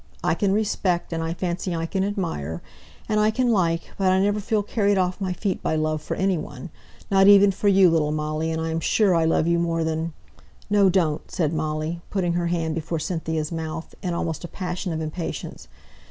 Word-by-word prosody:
I -, -, +2 dB
can 200 Hz, -3 st, +1 dB
respect, 195 Hz, -5 st, 0 dB
and 165 Hz, -, -2 dB
I 165 Hz, +1 st, -2 dB
fancy 180 Hz, 0 st, -2 dB
I 165 Hz, 0 st, -2 dB
can 190 Hz, +3 st, -1 dB
admire, 165 Hz, -, -3 dB, 0.4 s
and 215 Hz, -1 st, +1 dB
I 210 Hz, 0 st, +4 dB
can 245 Hz, +2 st, +1 dB
like, 170 Hz, -5 st, +1 dB
but 190 Hz, -1 st, +3 dB
I 185 Hz, -, +3 dB
never 205 Hz, +2 st, +2 dB
feel 210 Hz, 0 st, 0 dB
carried 205 Hz, -1 st, +1 dB
off 185 Hz, +1 st, 0 dB
my 190 Hz, -1 st, -1 dB
feet 190 Hz, +1 st, -2 dB
by -, -, 0 dB
love 155 Hz, 0 st, 0 dB
for -, -, -4 dB
any 190 Hz, -3 st, +1 dB
one, 175 Hz, +2 st, -8 dB, 0.4 s
not 195 Hz, 0 st, +5 dB
even 200 Hz, 0 st, +8 dB
for 200 Hz, +2 st, -2 dB
you, 195 Hz, -1 st, +6 dB
little 155 Hz, -2 st, +2 dB
Molly, 155 Hz, +1 st, -2 dB
and 160 Hz, 0 st, -2 dB
I'm 160 Hz, 0 st, -1 dB
sure 195 Hz, +3 st, +3 dB
I 165 Hz, -1 st, +3 dB
love 160 Hz, 0 st, +2 dB
you 170 Hz, 0 st, +2 dB
more 165 Hz, -1 st, 0 dB
than 160 Hz, +1 st, -2 dB, 0.3 s
" -, -, -28 dB
"No, 200 Hz, -2 st, +5 dB
don't!" 170 Hz, -5 st, 0 dB
said 160 Hz, -3 st, -1 dB
Molly, 155 Hz, +2 st, -2 dB
putting 180 Hz, -4 st, 0 dB
her 175 Hz, 0 st, 0 dB
hand 165 Hz, -2 st, -1 dB
before 165 Hz, +1 st, -3 dB
Cynthia's 160 Hz, -2 st, -2 dB
mouth, 160 Hz, 0 st, -5 dB
in 175 Hz, -2 st, -2 dB
almost 165 Hz, -1 st, -3 dB
a -, -, -4 dB
passion 180 Hz, +1 st, -4 dB
of 160 Hz, 0 st, -3 dB
impatience. 160 Hz, +2 st, -5 dB
170 Hz, 210 wpm, -24 LUFS, 160-195 Hz, 0.4 s, even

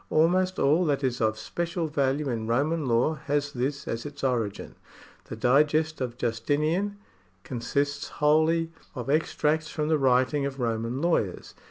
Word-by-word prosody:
Almost 185 Hz, +4 st, +2 dB
all 155 Hz, +6 st, +3 dB
that 145 Hz, -2 st, 0 dB
is 125 Hz, -2 st, -1 dB
of 110 Hz, -1 st, +1 dB
special 170 Hz, +8 st, -3 dB
value 145 Hz, -1 st, 0 dB
in 115 Hz, -4 st, -2 dB
Roman 145 Hz, +5 st, 0 dB
law 120 Hz, +6 st, +2 dB
has 145 Hz, 0 st, 0 dB
this 140 Hz, +3 st, -2 dB
as 115 Hz, +1 st, -3 dB
its 145 Hz, -1 st, -9 dB
origin; 115 Hz, -6 st, -1 dB, 0.5 s
the -, -, -7 dB
Digest 150 Hz, +3 st, +2 dB
of 120 Hz, -2 st, -3 dB
Justinian 150 Hz, -, 0 dB, 0.5 s
consists 140 Hz, +4 st, -2 dB
wholly 160 Hz, +2 st, +2 dB, 0.2 s
of 125 Hz, +1 st, -3 dB
extracts 155 Hz, 0 st, +1 dB
from 150 Hz, -1 st, -2 dB
the 155 Hz, -1 st, +3 dB
writ 130 Hz, 0 st, +3 dB
ings 140 Hz, -2 st, 0 dB
of 135 Hz, 0 st, -7 dB
Roman 115 Hz, +3 st, -2 dB
lawyers. 160 Hz, -, 0 dB
145 Hz, 155 wpm, -27 LUFS, 125-155 Hz, 0.5 s, all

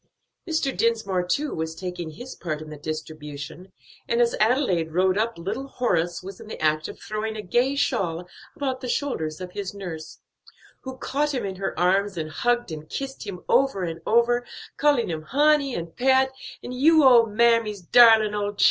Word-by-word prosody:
Mr. 315 Hz, -4 st, 0 dB
Dinsmore 220 Hz, -5 st, +1 dB
too 290 Hz, +9 st, 0 dB
was 160 Hz, 0 st, -4 dB
taking 180 Hz, -1 st, -5 dB
his 245 Hz, +12 st, -9 dB
part 155 Hz, -4 st, -4 dB
in 155 Hz, 0 st, -9 dB
the -, -, -6 dB
distribution, 155 Hz, +2 st, -7 dB, 0.4 s
and 235 Hz, -, +1 dB
as 235 Hz, -1 st, +3 dB
Adelaide 210 Hz, -, +1 dB
rode 185 Hz, +1 st, +3 dB
up 225 Hz, +1 st, -1 dB
little 210 Hz, +11 st, -4 dB
Horace 175 Hz, -10 st, -1 dB
was 195 Hz, 0 st, -9 dB
in -, -, -11 dB
the -, -, -7 dB
act 155 Hz, 0 st, +1 dB
of -, -, -10 dB
throwing 215 Hz, +1 st, -4 dB
a 210 Hz, -, -5 dB
gay 245 Hz, +8 st, +1 dB
shawl 180 Hz, -11 st, -1 dB, 0.3 s
about 265 Hz, -2 st, -3 dB
the 250 Hz, -, -5 dB
shoulders 160 Hz, -, -2 dB
of 180 Hz, -1 st, -7 dB
his 200 Hz, 0 st, -5 dB
nurse, 170 Hz, -5 st, -7 dB, 0.6 s
who 260 Hz, -1 st, -8 dB
caught 290 Hz, +3 st, -1 dB
him 240 Hz, -5 st, -2 dB
in 190 Hz, -1 st, -5 dB
her 195 Hz, -4 st, -3 dB
arms 190 Hz, +2 st, +2 dB
and 155 Hz, -1 st, -4 dB
hugged 240 Hz, +1 st, 0 dB
and 155 Hz, -1 st, -8 dB
kissed 270 Hz, -4 st, -5 dB
him 180 Hz, -3 st, -6 dB
over 270 Hz, -9 st, +2 dB
and 165 Hz, -1 st, -4 dB
over, 235 Hz, +2 st, +3 dB, 0.3 s
calling 285 Hz, -5 st, +2 dB
him 160 Hz, -2 st, -3 dB
"honey," 285 Hz, -, +2 dB
and 170 Hz, -1 st, -6 dB
"pet," 265 Hz, +1 st, +3 dB, 0.3 s
and 250 Hz, -, -6 dB
"you 310 Hz, +5 st, +5 dB
ole 240 Hz, -4 st, +7 dB
mammy's 220 Hz, -2 st, +2 dB
darlin' 220 Hz, +1 st, +6 dB
ole 205 Hz, 0 st, -2 dB
chil'!" 205 Hz, -, -19 dB
210 Hz, 185 wpm, -24 LUFS, 175-250 Hz, 0.6 s, ole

